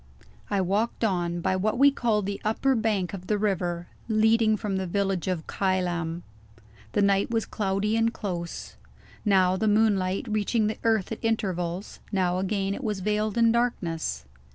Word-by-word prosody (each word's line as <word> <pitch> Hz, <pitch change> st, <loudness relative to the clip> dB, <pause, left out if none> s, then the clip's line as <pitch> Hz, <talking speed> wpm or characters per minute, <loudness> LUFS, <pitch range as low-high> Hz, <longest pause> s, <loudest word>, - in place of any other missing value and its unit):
I 200 Hz, -2 st, +1 dB
walked 205 Hz, +6 st, 0 dB
on, 175 Hz, -4 st, 0 dB
by 190 Hz, +2 st, +1 dB
what 210 Hz, +5 st, 0 dB
we 280 Hz, +2 st, +6 dB
called 220 Hz, -6 st, 0 dB
the 200 Hz, 0 st, -4 dB
upper 225 Hz, +5 st, +1 dB
bank 215 Hz, -6 st, 0 dB
of 185 Hz, -1 st, -7 dB
the 210 Hz, -, +1 dB
river; 175 Hz, -4 st, -1 dB, 0.2 s
leading 220 Hz, 0 st, +3 dB
from 205 Hz, -2 st, -2 dB
the 190 Hz, -1 st, -2 dB
village 195 Hz, -1 st, -1 dB
of 180 Hz, -4 st, -2 dB
Kylam. 175 Hz, -3 st, -1 dB, 0.7 s
The 205 Hz, -, +3 dB
night 200 Hz, 0 st, +2 dB
was 225 Hz, -1 st, 0 dB
cloudy 205 Hz, +1 st, -1 dB
and 225 Hz, 0 st, +2 dB
close. 175 Hz, -6 st, -5 dB, 0.5 s
Now 190 Hz, -2 st, +4 dB
the 220 Hz, -, 0 dB
moonlight 205 Hz, -3 st, +2 dB
reached 215 Hz, 0 st, -1 dB
the 215 Hz, -, -3 dB
earth 225 Hz, -4 st, +1 dB
at 225 Hz, -, -5 dB
intervals; 190 Hz, -5 st, -2 dB
now 185 Hz, -3 st, +1 dB
again 195 Hz, 0 st, -1 dB
it 275 Hz, -, -6 dB
was 210 Hz, -4 st, -2 dB
veiled 210 Hz, +2 st, 0 dB
in 230 Hz, -1 st, +5 dB
darkness. 165 Hz, -, -1 dB
200 Hz, 165 wpm, -26 LUFS, 185-220 Hz, 0.7 s, we